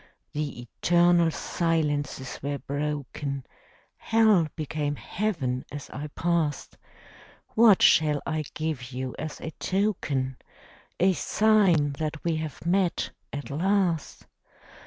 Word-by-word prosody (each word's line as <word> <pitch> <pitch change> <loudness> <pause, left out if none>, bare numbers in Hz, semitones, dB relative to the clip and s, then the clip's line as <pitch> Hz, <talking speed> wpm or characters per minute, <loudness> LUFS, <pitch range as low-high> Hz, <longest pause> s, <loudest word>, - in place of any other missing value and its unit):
The 145 -5 -3
eternal 175 +6 +3
silences 150 -6 -1
were 140 +1 -2
broken; 140 -1 -4 0.5
Hell 215 -7 +4
became 150 -1 -2
Heaven 140 -11 -2
as 145 -1 -7
I 145 +3 -5
passed. 165 -4 -1 0.7
What 220 -4 +5
shall 150 -2 +5
I 155 -1 -2
give 150 -6 -3
you 130 0 -4
as 155 -1 -5
a 160 - -5
token, 155 -10 -1 0.6
A 190 +1 +4
sign 190 -8 +3
that 155 -1 -3
we 165 -2 0
have 155 -2 -6
met, 180 0 +1 0.2
at 145 0 -6
last? 175 0 0
155 Hz, 110 wpm, -27 LUFS, 145-175 Hz, 0.7 s, What